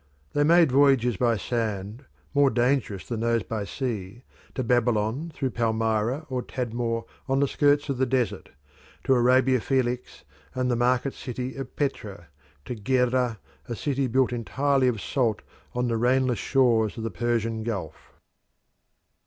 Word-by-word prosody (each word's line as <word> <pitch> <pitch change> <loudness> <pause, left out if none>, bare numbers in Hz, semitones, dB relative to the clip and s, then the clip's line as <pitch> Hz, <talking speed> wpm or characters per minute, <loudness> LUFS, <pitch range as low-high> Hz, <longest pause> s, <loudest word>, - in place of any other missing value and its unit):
They 145 - +2
made 165 -1 +5
voyages 135 -4 +4
by 115 +2 +1
sand, 110 +1 -3 0.3
more 140 -1 +5
dangerous 120 - 0
than 115 - -3
those 115 -1 +1
by 110 -2 -4
sea, 115 -2 -5 0.3
to 130 - -1
Babylon 120 +5 +1
through 135 -3 -2
Palmyra 115 +4 0
or 130 -3 -2
Tadmor 120 -2 -3 0.3
on 135 0 +2
the 140 - +3
skirts 145 +1 +2
of 135 -3 -2
the 130 - +2
desert; 125 -1 -1 0.5
to 135 - +3
Arabia 130 0 +4
Felix 125 -1 -1 0.3
and 130 -1 0
the - - +2
market 125 +3 +1
city 125 +1 -5
of 135 -2 -7
Petra; 135 -8 -2
and 85 - -16 0.4
to 125 - -4
Gerrha, 125 0 +1 0.3
a 120 - -2
city 140 +2 -1
built 130 +1 +2
entirely 135 +3 +1
of 120 -4 0
salt 115 -2 -1 0.3
on 125 0 0
the 115 -1 0
rainless 125 +1 +2
shores 120 -6 +2
of 115 - -4
the 115 - -3
Persian 115 +2 -1
Gulf. 110 -4 -5
125 Hz, 155 wpm, -26 LUFS, 115-130 Hz, 0.5 s, made